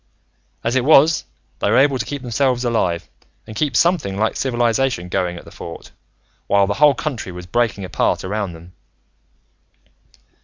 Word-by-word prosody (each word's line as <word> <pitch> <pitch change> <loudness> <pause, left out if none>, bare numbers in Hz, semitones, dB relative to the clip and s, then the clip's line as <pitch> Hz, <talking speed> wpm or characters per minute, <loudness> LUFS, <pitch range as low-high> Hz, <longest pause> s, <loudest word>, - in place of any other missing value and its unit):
"As 115 +2 0
it 130 - +2
was, 155 +2 +5 0.3
they - - +1
were 115 - +3
able 135 -1 +4
to - - -2
keep 145 -2 -5
themselves 125 +1 0
alive, 95 -8 0 0.4
and 110 - -10
keep 140 +1 -1
something 160 - +2
like 110 +2 0
civilization 120 -6 0
going 90 -2 -1
at - - -11
the - - -13
Fort, 85 - -9 0.6
while 100 0 +4
the 100 - -1
whole 145 -2 +6
country 125 -6 -4
was 90 0 -9
breaking 110 -1 -1
apart - - 0
around 100 -1 -3
them. 85 +2 -14
115 Hz, 160 wpm, -20 LUFS, 95-135 Hz, 0.6 s, whole